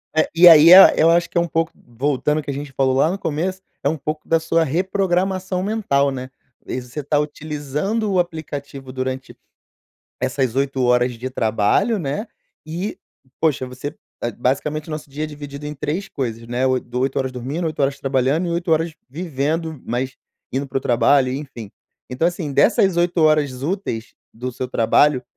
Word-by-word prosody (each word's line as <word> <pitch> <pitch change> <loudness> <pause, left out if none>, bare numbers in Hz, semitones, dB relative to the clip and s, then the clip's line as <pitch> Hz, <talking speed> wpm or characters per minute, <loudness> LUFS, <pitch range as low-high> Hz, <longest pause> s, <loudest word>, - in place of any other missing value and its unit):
É, 155 - +2
e 175 +1 +8
aí 165 +1 +9
é 190 +1 +10
eu 160 +1 +5
acho 170 0 +3
que - - -4
é - - +5
um 170 - -1
pouco 165 0 -1
voltando 140 +5 -1
o - - -5
que 145 - -4
a - - -4
gente 140 0 -7
falou 130 -1 +1
lá 150 +4 +3
no 190 - -2
começo, 185 +2 -2 0.2
é - - 0
um 160 - -2
pouco 155 +2 -5
da 165 - +3
sua 165 +1 +1
reprogramação 185 +3 0
mental, 190 -10 +1
né. 130 -1 -6 0.4
E 130 - -3
você 125 +4 -7
tá 145 +1 0
utilizando 150 +8 -2
o 185 - +2
aplicativo 145 -5 -5
durante 130 0 -4 0.8
essas 130 -1 -1
8 135 -1 0
horas 125 0 +3
de 120 +2 -5
trabalho, 115 - +1
né? 150 - -3 0.4
E, 170 +6 -4 0.4
poxa, 155 -5 +1
você 130 +4 -7 0.3
é, 120 - -1
basicamente 145 +6 -1
o - - -6
nosso 155 -1 -6
dia 150 +3 -5
é - - -2
dividido 145 -1 -8
em 150 - -5
3 155 +8 -3
coisas, 115 - -4
né, 125 +2 0
oi 130 -1 +2
do 120 +1 -5
8 135 +1 -1
horas 130 -1 -1
dormindo, 135 +7 -4
8 155 -2 -4
horas 135 0 0
trabalhando 135 +5 +1
e - - -2
8 170 0 0
horas 160 +1 +1 0.2
vivendo, 160 0 -3
mas 130 +2 -2 0.3
indo 135 +2 -2
para 135 - -2
o - - -8
trabalho 130 +2 +3
e 130 - -2
enfim. 120 -8 -9 0.4
Então, 125 +6 0
assim, 175 -3 -2
dessas 185 +5 +3
8 175 +1 +1
horas 145 -4 +2
úteis 150 - -3 0.2
do 125 +3 -5
seu 125 +1 -4
trabalho, 130 +3 +3
145 Hz, 195 wpm, -21 LUFS, 130-165 Hz, 0.8 s, é